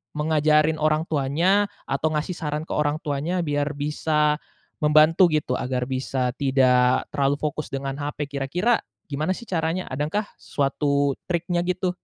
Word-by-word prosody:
mengajari 155 0 +3
orang 155 +1 +2
tuanya 170 +9 +2 0.2
atau 155 +3 -1
ngasih 150 +4 -1
saran 150 -2 -3
ke - - -10
orang 150 0 +1
tuanya 155 +5 -1
biar 145 -1 -1
bisa 150 +1 +1 0.4
membantu 155 +4 +5
gitu, 150 -5 -1
agar 125 0 -1
bisa 130 -1 -1
tidak 130 -2 +3
terlalu 140 0 +1
fokus 150 0 -3
dengan 135 +1 -4
HP 145 0 -4
kira-kira 180 - +1 0.3
gimana 155 +7 -1
sih - - -9
caranya? 170 -2 -1
Adakah 150 +11 -1 0.2
suatu 140 0 0 0.2
triknya, 175 0 -1
gitu? 180 0 0
150 Hz, 140 wpm, -24 LUFS, 140-160 Hz, 0.4 s, membantu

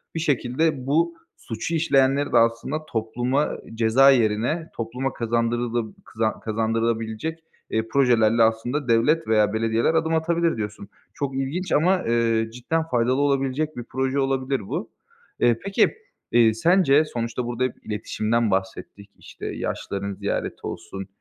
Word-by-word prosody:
Bir - - -1
şekilde 140 -1 0
bu 165 +4 +2 0.2
suçu 115 +9 -4
işleyenleri 140 -3 +2
de - - +6
aslında 115 +7 +1
topluma 120 +4 -1 0.2
ceza 115 +4 +5
yerine, 120 +8 +1
topluma 125 +3 -3
kazandırılı 115 0 -1
kızan 110 0 -2
kazandırılabilecek, 115 +6 -2 0.3
eee, 110 0 -1
projelerle 115 -4 +4
aslında 120 +5 0
devlet 150 +8 +2
veya 105 -2 +3
belediyeler 115 +5 +1
adım 160 0 +1
atabilir 170 -1 +1
diyorsun. 105 -1 -6 0.2
Çok 140 -2 -3
ilginç 155 +7 -3
ama, 180 +5 +3
eee, 115 -1 +1
cidden 145 +7 -1
faydalı 130 -2 +1
olabilecek 140 +2 0
bir 120 - -4
proje 130 +3 -1
olabilir 135 -1 0
bu. - - -4 0.5
Eee, 120 -2 +3
peki, 195 0 +2 0.4
eee, 115 -2 +5
sence 155 - +4
sonuçta 120 -3 -3
burada 120 +1 -2
hep 130 - 0
iletişimden 110 +1 -1
bahsettik, 95 +1 -4
işte, - - -11
yaşlıların 100 0 -4
ziyareti - - -4
olsun, 95 0 -7
120 Hz, 135 wpm, -24 LUFS, 115-145 Hz, 0.5 s, de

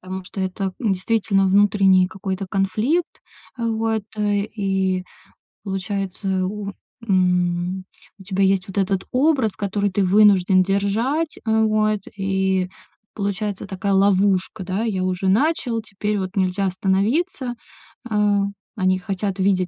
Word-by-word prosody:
Потому 185 0 -6
что 195 - -7
это, 190 0 -2
м, 220 -5 +1
действительно 195 0 +1
внутренний 195 -1 +4
какой-то 190 0 -4
конфликт. 215 - 0 0.4
Вот, 225 -1 0
э, 205 -1 +1
и 190 -2 0 0.6
получается, 195 -1 -2
у, 200 +1 -4 0.4
м, 180 -1 +1 0.3
у - - -12
тебя 195 0 0
есть 190 -1 +2
вот 195 - -8
этот 195 -1 0
образ, 260 -5 +2
который 205 0 -1
ты 195 +1 0
вынужден 190 -1 +5
держать. 220 - 0
Э, 220 0 +3
вот. 215 -1 +1 0.2
И 190 -1 0 0.5
получается 200 0 -3
такая 195 0 -2
ловушка, 195 -1 +2
да, 190 +4 -2
я 200 -5 -1
уже 185 +1 -1
начал, 235 - +1
теперь 210 0 -3
вот 185 0 -4
нельзя 190 0 +1
остановиться. 240 - 0 0.5
А, 210 -2 +2 0.3
они 185 -2 +1
хотят 195 0 -3
видеть, 185 -1 +2
195 Hz, 130 wpm, -22 LUFS, 190-210 Hz, 0.6 s, вынужден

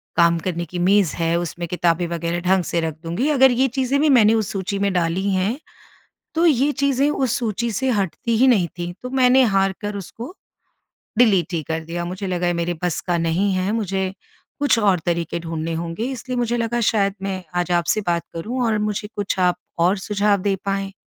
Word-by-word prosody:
काम 170 -1 +4
करने 170 0 -3
की 175 +1 -6
मेज़ 185 -2 +3
है, 165 0 0
उसमें 175 0 -4
किताबें 175 0 +1
वगैरह 170 0 -2
ढंग 185 +1 +2
से 170 - -1
रख 160 -2 -3
दूँगी। 175 - -1
अगर 265 -3 +5
ये 255 +2 +2
चीज़ें 265 +1 +1
भी 305 - +3
मैंने 225 -5 +6
उस 220 -3 0
सूची 195 0 -3
में 200 0 +1
डाली 175 +1 0
हैं, 195 +6 0 0.8
तो 330 +1 +2
ये 285 -2 +3
चीज़ें 280 0 +2
उस 265 -5 0
सूची 235 0 -2
से 265 +5 0
हटती 215 +2 -1
ही 255 +4 +4
नहीं 200 -9 +3
थी। 175 0 -4
तो 250 - -5
मैंने 260 0 +4
हार 195 0 +3
कर 205 -1 -4
उसको, 230 - -8 0.8
डिलीट 195 -8 +4
ही 165 -2 -1
कर 160 0 -1
दिया। 170 +1 -4
मुझे 185 +3 -5
लगा 180 -1 -1
ये 175 - +2
मेरे 175 +1 -2
बस 175 -2 -1
का 175 -2 +1
नहीं 165 +5 +1
है। 185 +2 0
मुझे 190 -4 -1 0.5
कुछ 285 -4 +3
और 200 -4 +3
तरीके 170 -1 -1
ढूँढ़ने 165 0 -4
होंगे। 165 +6 -4
इसलिए 255 0 -5
मुझे 240 0 0
लगा, 235 0 -1
शायद 200 -3 +2
मैं 190 -1 -3
आज 175 0 0
आपसे 170 +5 0
बात 170 -1 +1
करूँ 235 +10 -3
और 220 -2 +1
मुझे 210 0 -2
कुछ 205 -1 -2
आप 180 -1 +3 0.2
और 180 +4 +3
सुझाव 205 +1 +1
दे 195 0 +1
पाएँ। 195 0 -2
195 Hz, 205 wpm, -21 LUFS, 175-230 Hz, 0.8 s, मैंने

